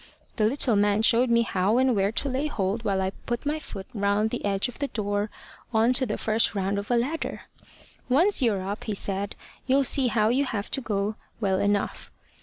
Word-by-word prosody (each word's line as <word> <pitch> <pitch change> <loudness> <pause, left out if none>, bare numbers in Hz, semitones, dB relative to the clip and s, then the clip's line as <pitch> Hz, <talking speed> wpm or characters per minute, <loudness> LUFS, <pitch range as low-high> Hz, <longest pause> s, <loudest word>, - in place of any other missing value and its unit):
The 215 - +3
little 245 0 +2
man 205 +1 +2
showed 235 +2 +4
me 235 0 +4
how 200 +1 +1
and 260 -1 +3
where 195 0 +1
to 255 - -1
lay 270 +3 -1
hold 205 -3 -2
while 195 -3 0
I 190 - -1 0.2
put 240 +2 -2
my 300 +2 -1
foot 195 -9 -8
round 205 +1 +1
the 245 - -4
edge 200 +1 +1
of 245 - -10
the 285 - -1
door 205 -3 -2 0.4
on 225 +2 +3
to 260 0 +1
the 210 - -2
first 220 0 +1
round 200 +1 0
of 200 - -7
a 245 - +3
ladder. 285 +8 -2 0.7
`Once 335 +8 +4
you're 200 -6 +1
up,' 205 +2 -5
he 215 -3 -2
said, 195 +1 -3 0.3
`you'll 275 +1 +4
see 265 0 +4
how 220 -2 +2
you 265 +4 +2
have 210 -5 -4
to 270 - -1
go 210 -2 -2 0.2
well 190 -4 +1
enough.' 205 0 -1
220 Hz, 215 wpm, -26 LUFS, 200-250 Hz, 0.7 s, showed